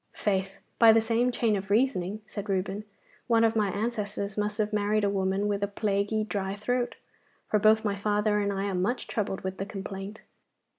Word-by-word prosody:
'Faith, 195 -2 -1 0.2
by 230 -1 +9
the 225 - +5
same 230 +2 +1
chain 230 -3 +1
of 195 0 -4
reasoning,' 210 -3 +1
said 210 -1 -7
Reuben, 195 +2 -1 0.4
'one 230 -1 +4
of 225 0 +3
my 210 -2 +2
ancestors 205 -1 -3
must 210 0 -1
have 215 -1 -1
married 210 0 +1
a 200 - +2
woman 195 +1 0
with 200 -1 -1
a 200 - +1
plaguy 205 +1 0
dry 200 -2 -3
throat, 245 +4 -1 0.6
for 210 - +4
both 220 +1 +4
my 205 -1 +1
father 210 +1 +1
and 200 -1 0
I 195 0 -2
are 200 - -2
much 195 +8 -1
troubled 195 -3 -2
with 190 0 -5
the 195 - -2
complaint. 195 +1 -7
205 Hz, 195 wpm, -28 LUFS, 195-220 Hz, 0.6 s, by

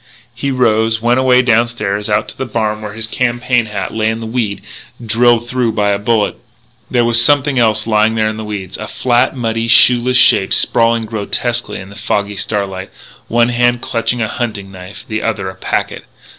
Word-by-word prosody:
He 125 +4 -3
rose, 110 -3 +1
went 120 +3 +1
away 130 -1 +4
downstairs 110 -3 0
and 105 - +3
out 105 - -5
to - - -9
the 130 - -5
barn, 110 -1 -2
where 105 -1 -7
his 110 +1 -4
campaign 120 0 -1
hat 105 -1 -5
lay 110 0 0
in 110 0 -3
the 115 - -6
weed, 110 -4 -3 0.4
drilled 120 +1 +3
through 125 -2 -1
by 105 -1 0
a 100 0 0
bullet. 105 0 0 0.5
There 120 -2 +1
was 120 0 +5
something 140 0 +2
else 110 -2 +2
lying 110 0 +2
there 110 -1 +1
in 110 0 -4
the 110 - -6
weeds, 100 -3 -6
a 110 - -6
flat, 120 +1 0
muddy, 115 -2 -2
shoeless 125 +2 +5
shape 95 -5 +4
sprawling 115 -1 +2
grotesquely 115 +3 -2
in 95 0 -10
the 100 - -13
foggy 105 -1 -2
starlight. 95 -2 -3 0.4
One 120 +1 +2
hand 120 0 +1
clutched 115 -1 -1
a 110 - 0
hunting 105 -5 -5
knife; 95 +3 -11
the 110 -3 -3
other 100 -4 -2
a - - -16
packet. 95 - -3
115 Hz, 195 wpm, -15 LUFS, 105-120 Hz, 0.5 s, was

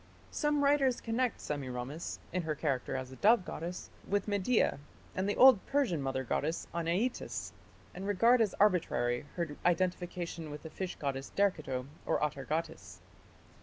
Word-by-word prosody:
Some 295 -1 +1
writers 280 -3 +3
connect 235 +1 -1
Semiramis, 135 +2 -4 0.2
in 185 - +1
her 160 -2 -2
character 140 -4 -1
as 130 0 -4
a 130 - -10
dove 215 -2 +5
goddess, 175 +2 -6 0.2
with 205 +1 0
Media 205 - +2 0.4
and 190 +2 0
the 205 - 0
old 255 -6 +8
Persian 250 - +1
mother 135 -1 -1
goddess 155 +6 -1
Anaitis, 170 +9 -1 0.4
and 190 +2 -6
regard 230 +5 +4
as 210 -4 +1
arbitrary 145 -10 +2
her 170 -4 -2
identification 175 -2 -1
with 150 0 -8
the 160 - -8
fish 185 -2 -4
goddess 135 -1 -4
Derceto 155 -10 0 0.2
or - - +2
Atargatis. 150 - -3
175 Hz, 145 wpm, -32 LUFS, 145-205 Hz, 0.4 s, old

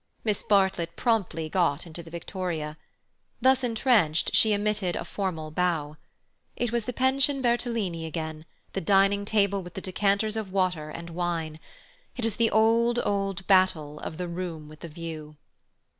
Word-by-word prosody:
Miss 210 -3 0
Bartlett 190 -5 +2
promptly 195 -9 0
got 165 -2 +1
into 170 0 -8
the 165 - -12
victoria. 170 -3 -4 0.6
Thus 260 +1 +4
entrenched, 225 - +2
she 220 - +5
emitted 205 -3 0
a - - -3
formal 165 -6 -3
bow. 155 -3 0 0.6
It 240 -2 -1
was 235 -2 0
the 250 - -2
pension 265 +2 +2
Bertolini 230 -9 0
again, 160 -1 -5 0.3
the 195 - -2
dining 200 +1 +3
table 200 -2 +2
with 175 -1 -11
the - - -3
decanters 200 +3 +1
of 215 -4 -4
water 180 -5 0
and 170 +2 -8
wine. 165 -2 -2 0.6
It 245 - -3
was 225 - -1
the 230 -1 +3
old, 230 +2 +3
old 195 -2 -1
battle 175 -6 +3
of 160 - -6
the 180 - -3
room 170 -3 -5
with 155 0 -13
the - - -7
view. 155 -2 -7
185 Hz, 160 wpm, -27 LUFS, 165-215 Hz, 0.6 s, she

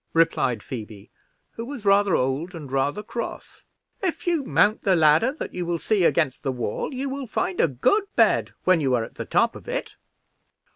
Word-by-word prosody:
replied 135 -8 +2
Phoebe, 105 -4 -8 0.4
who 230 - -7
was 245 -3 -8
rather 200 -1 +4
old 140 +8 -1
and 150 -5 -8
rather 140 +9 0
cross. 235 +2 -6 0.4
"If 370 -4 -2
you 340 -5 +1
mount 215 -4 +2
the 195 -3 +3
ladder 160 - +4
that 305 - -7
you 180 - -3
will 170 0 -1
see 195 +1 +1
against 155 -7 +1
the 135 - -1
wall, 120 - -3
you 270 +1 -3
will 270 -1 -5
find 190 -3 -1
a - - +4
good 270 - +1
bed - - +3
when 185 -3 +4
you 130 -3 +2
are 115 - 0
at - - -9
the - - -6
top - - +2
of - - -12
it." - - -4
175 Hz, 195 wpm, -24 LUFS, -, 0.4 s, rather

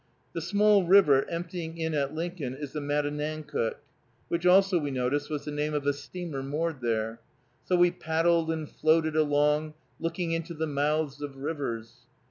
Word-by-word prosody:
The 165 - -3
small 205 +3 +4
river 170 -7 +5
emptying 170 -1 -5
in 160 -1 -2
at 140 -2 0
Lincoln 160 -5 -4
is 145 0 -7
the 155 - -2
Matanancook, 150 -2 -2 0.5
which 170 +1 0
also, 190 0 +5
we 145 -2 -2
noticed, 135 +2 -1
was 150 -2 -4
the 150 - -4
name 150 +1 -1
of 145 -1 -2
a 145 - +3
steamer 145 0 -6
moored 150 +1 -2
there. 115 -1 -1 0.5
So 180 - +2
we 175 0 +5
paddled 165 0 +1
and 160 -2 -2
floated 160 +1 +2
along, 150 0 +2 0.2
looking 165 +1 -2
into 165 +1 -3
the 160 +1 -1
mouths 145 0 -1
of 140 -2 -6
rivers. 125 -5 -5
155 Hz, 165 wpm, -28 LUFS, 145-165 Hz, 0.5 s, river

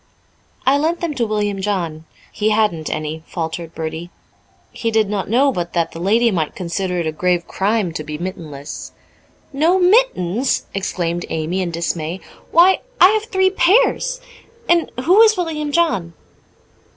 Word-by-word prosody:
"I 275 +2 +4
lent 330 +3 0
them 335 -3 -2
to 240 -5 -1
William 205 -2 -1
John 170 -6 -2 0.3
he 215 0 0
hadn't 210 -8 +1
any," 155 +1 -4
faltered 165 -1 -5
Bertie. 160 +2 -5 0.6
He 230 - -2
did 220 -2 +2
not 200 -2 -2
know 270 +5 +3
but 175 -7 -4
that 170 -1 0
the 165 - -9
lady 225 +6 +3
might 160 -6 -2
consider 180 +1 -3
it 170 - -1
a 155 - -1
grave 175 +2 0
crime 200 -3 0
to 155 - -4
be 150 0 -6
mittenless. 160 -5 -7 0.6
"No 320 +7 +3
mittens!" 355 - +2
exclaimed 175 -3 -2
Amy 160 +4 -2
in 180 - -2
dismay. 170 +1 -3 0.3
"Why, 360 +3 +5 0.2
I 365 - +8
have 430 +1 0
three 380 -3 +2
pairs. - - +2 0.5
And 340 -1 +2
who 370 +8 +6
is 440 -2 +5
William 310 -4 -2
John?" 285 - +1
195 Hz, 155 wpm, -19 LUFS, -, 0.6 s, I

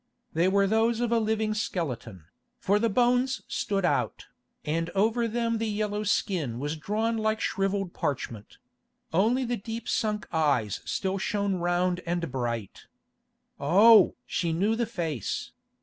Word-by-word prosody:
They 170 +3 +2
were 200 +1 +3
those 225 +3 +2
of 240 -1 0
a 235 - +4
living 220 -1 0
skeleton, 125 - -4 0.3
for 200 +2 +2
the 230 +1 +2
bones 250 +4 +2
stood 195 -3 -1
out, - - 0 0.4
and 165 +2 -1
over 225 +4 +2
them 230 0 -1
the 225 - -1
yellow 210 0 -1
skin 175 - 0
was 145 +4 -3
drawn 215 +8 -1
like 220 0 0
shrivelled 195 -2 -1
parchment; 115 -6 -4 0.6
only 230 +9 +2
the 240 0 -1
deep 225 +3 -6
sunk 215 -2 -1
eyes 140 - +1
still 190 0 -2
shone 200 -1 -1
round 175 +1 0
and 170 -3 -2
bright. 120 -5 -4 0.7
Oh! 200 +8 +6
she 170 -2 -1
knew 200 +7 +1
the 235 0 -1
face. 160 - -3
200 Hz, 145 wpm, -27 LUFS, 165-220 Hz, 0.7 s, Oh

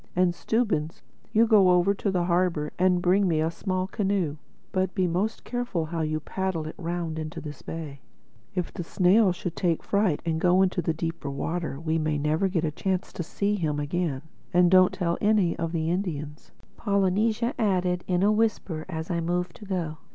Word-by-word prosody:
And 180 -1 +3
Stubbins, 175 -7 -1 0.3
you 225 +2 +5
go 210 -5 +5
over 180 +2 +4
to 200 - -2
the 180 -2 +1
harbor 175 -3 0
and 180 -1 +3
bring 190 +2 +3
me 160 -3 +1
a 160 +1 +1
small 185 +1 -2
canoe. 190 -6 -1 0.3
But 185 -1 -1
be 185 - +2
most 185 +6 -1
careful 245 -9 -2
how 165 +1 -3
you 155 0 -1
paddle 185 0 -3
it 155 - -6
round 170 -2 -3
into 155 +2 -5
this 150 -2 -8
bay. 150 -4 -7 0.5
If 180 -2 -2
the 175 - -4
snail 185 +4 +4
should 175 -1 -5
take 170 -4 0
fright 200 -7 +1
and 160 -1 -1
go 180 0 +4
out - - +5
into 185 -1 0
the 165 - 0
deeper 165 -3 -4
water, 155 +1 -3
we 160 0 0
may 155 -1 0
never 155 +6 +1
get 175 -3 0
a 155 - -1
chance 185 +3 -2
to - - -4
see 200 +5 -1
him 155 -7 -1
again." 145 -2 -2 0.3
"And 175 0 +4
don't 185 -1 +6
tell 180 -3 -1
any 205 -5 +3
of 165 -1 -1
the 165 -1 -1
Indians," 155 -5 -4 0.3
Polynesia 210 +3 +1
added 180 -4 +1
in 180 0 +1
a 205 - +5
whisper 210 -7 0
as 160 0 -4
I 170 - 0
moved 175 +1 -2
to 210 - -11
go. 170 -5 -3
175 Hz, 195 wpm, -26 LUFS, 160-190 Hz, 0.5 s, don't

